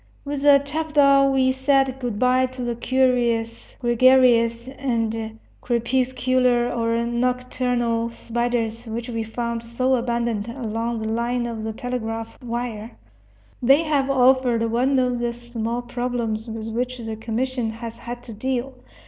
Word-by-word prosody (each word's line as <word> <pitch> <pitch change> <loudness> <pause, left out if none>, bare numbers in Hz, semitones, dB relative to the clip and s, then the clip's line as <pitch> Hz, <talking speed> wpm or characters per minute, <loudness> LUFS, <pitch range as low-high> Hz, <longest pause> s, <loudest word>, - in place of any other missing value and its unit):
With 285 -1 -3
the 285 -1 +7
chapadao 285 -2 +3
we 260 -1 +3
said 265 0 +1
good 240 -5 -3
by 255 +2 +3
to 255 0 -7
the 240 0 -1
curious, 235 -2 0
gregarious, 240 -1 +4
and 225 -4 -2 0.2
crepuscular 250 0 +1
or 230 0 0
nocturnal 245 -1 0
spiders 235 0 -2
which 230 +2 -5
we 230 -1 -2
found 235 +1 -3
so 235 +3 0
abundant 235 -3 -1
along 230 -2 -3
the - - -3
line 235 +2 -1
of 230 -2 -4
the 220 - -3
telegraph 225 -1 -4
wire. 235 -2 -5 0.6
They 275 +6 +5
have 285 -4 +1
offered 250 -3 +3
one 260 +4 +2
of 250 -1 +1
the 240 0 -1
small 240 0 -4
problems 240 -2 -3
with 220 -1 -5
which 250 +3 -2
the 225 -2 -5
commission 230 +2 -2
has 230 +1 -7
had 240 0 -7
to 230 - -9
deal. 260 +4 -2
240 Hz, 140 wpm, -23 LUFS, 230-255 Hz, 0.6 s, the